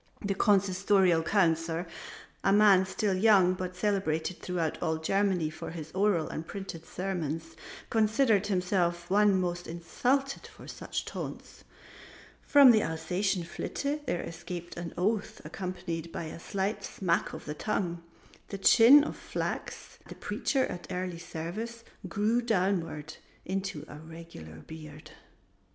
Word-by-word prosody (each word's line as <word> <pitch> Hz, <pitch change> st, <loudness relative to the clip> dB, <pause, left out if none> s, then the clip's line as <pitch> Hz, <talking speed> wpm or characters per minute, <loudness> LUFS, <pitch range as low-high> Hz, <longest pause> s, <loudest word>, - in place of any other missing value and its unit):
The 200 Hz, -, +1 dB
Consistorial 195 Hz, -3 st, +3 dB
Councillor, 165 Hz, -3 st, +1 dB, 0.6 s
a 195 Hz, -, +3 dB
man 200 Hz, -2 st, +6 dB
still 195 Hz, +1 st, 0 dB
young 190 Hz, -2 st, +5 dB
but 185 Hz, 0 st, -5 dB
celebrated 185 Hz, -4 st, -1 dB
throughout 170 Hz, -4 st, -2 dB
all 160 Hz, -2 st, 0 dB
Germany 180 Hz, -1 st, +1 dB
for -, -, -7 dB
his 160 Hz, -2 st, -7 dB
oral 190 Hz, -3 st, +2 dB
and 155 Hz, -, -5 dB
printed 180 Hz, -5 st, -7 dB
sermons, 165 Hz, -3 st, -4 dB, 0.4 s
considered 220 Hz, -1 st, +3 dB
himself 180 Hz, -3 st, 0 dB
the 185 Hz, -, -2 dB
one 205 Hz, -2 st, +5 dB
most 175 Hz, -1 st, -2 dB
insulted 250 Hz, -, -1 dB
by -, -, -12 dB
such -, -, -5 dB
taunts. -, -, -7 dB, 0.8 s
From 280 Hz, -3 st, +7 dB
the 220 Hz, -2 st, +4 dB
Alsatian 180 Hz, +3 st, -1 dB
Flitte 285 Hz, -, -3 dB
there 175 Hz, -, -1 dB
escaped 175 Hz, +1 st, -7 dB
an 170 Hz, -1 st, -5 dB
oath 205 Hz, +3 st, -1 dB
accompanied 175 Hz, -3 st, -5 dB
by -, -, -4 dB
a 160 Hz, +1 st, -7 dB
slight 195 Hz, +4 st, -2 dB
smack 175 Hz, -3 st, -1 dB
of -, -, -8 dB
the 150 Hz, -, -4 dB
tongue. 175 Hz, 0 st, -2 dB, 0.5 s
The 200 Hz, -, -5 dB
chin 245 Hz, +8 st, +8 dB
of -, -, -4 dB
Flachs, -, -, -5 dB
the -, -, -9 dB
Preacher 270 Hz, -3 st, 0 dB
at 175 Hz, -, -7 dB
Early 180 Hz, -2 st, -3 dB
Service, 210 Hz, +9 st, -6 dB, 0.3 s
grew 215 Hz, +7 st, +1 dB
downward 180 Hz, -8 st, -1 dB, 0.3 s
into 190 Hz, -5 st, -3 dB
a 150 Hz, -, -10 dB
regular 160 Hz, -, -11 dB
beard. 155 Hz, -1 st, -10 dB
185 Hz, 135 wpm, -29 LUFS, 165-205 Hz, 0.8 s, chin